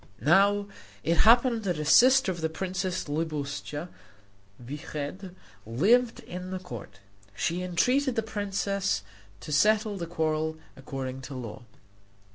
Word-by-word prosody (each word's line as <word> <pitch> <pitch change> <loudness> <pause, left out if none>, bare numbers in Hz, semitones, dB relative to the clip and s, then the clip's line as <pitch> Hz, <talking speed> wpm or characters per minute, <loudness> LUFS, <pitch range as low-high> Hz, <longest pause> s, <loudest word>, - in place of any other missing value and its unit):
Now 200 +6 +4 0.4
it 165 +1 +1
happened 235 -1 +5
that 180 -6 -1
a 150 - -3
sister 255 - +6
of 175 -2 -6
the 160 - 0
princess 185 +2 -2
Libuscha 150 0 -3 0.7
Vyched 150 +7 -6 0.4
lived 225 - +3
at 180 +1 -7
the 190 - -3
court. 180 - -9 0.4
She 170 - -1
entreated 245 +10 +1
the 225 - 0
princess 200 - -1 0.4
to 155 - -8
settle 210 +6 +3
the 170 -2 -4
quarrel 160 -1 -1 0.2
according 135 -1 -6
to 135 +1 -8
law. 115 -5 -7
175 Hz, 125 wpm, -28 LUFS, 150-205 Hz, 0.7 s, sister